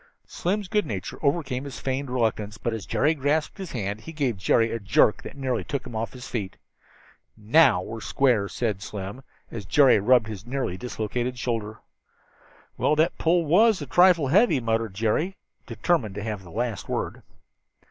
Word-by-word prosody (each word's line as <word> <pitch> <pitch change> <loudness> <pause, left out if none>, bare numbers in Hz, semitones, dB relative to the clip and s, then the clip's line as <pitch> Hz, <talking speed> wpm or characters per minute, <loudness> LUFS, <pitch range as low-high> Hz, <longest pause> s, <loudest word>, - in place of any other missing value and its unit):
Slim's 200 +3 -2
good 210 +2 0
nature 100 -5 -5
overcame 140 -3 0
his 140 -3 -7
feigned 135 +1 -3
reluctance, 110 -3 -1
but 120 - -2
as 110 -3 -6
Jerry 150 +4 +2
grasped 150 +5 -1
his 190 -3 -6
hand 105 -2 -3
he 165 - -9
gave 140 -7 -1
Jerry 115 +4 +2
a 115 - -2
jerk 100 +1 +3
that - - -10
nearly 130 -3 -1
took 140 -3 -4
him 120 -3 -8
off 110 +1 -3
his 125 -1 -9
feet. 100 -6 -4 0.8
"Now 110 - +4
we're 115 +2 -7
square," 120 -7 +1
said 105 -5 -2
Slim, 100 +5 -6 0.3
as 115 -3 -6
Jerry 130 +5 +5
rubbed 120 +2 +4
his 105 -3 -7
nearly 125 -6 -3
dislocated 125 +3 -3
shoulder. 110 -3 -3 1.0
"Well, 150 - +3
that 160 +3 +1
pull 170 +1 +2
was 210 +7 +4
a 145 - -5
trifle 170 0 +4
heavy," 200 - +4
muttered 115 -3 -1
Jerry, 115 - 0 0.3
determined 125 - 0
to 105 - -5
have 105 -3 -4
the 90 - -13
last 110 +3 -3
word. - - -3
125 Hz, 175 wpm, -25 LUFS, 110-145 Hz, 1.0 s, Jerry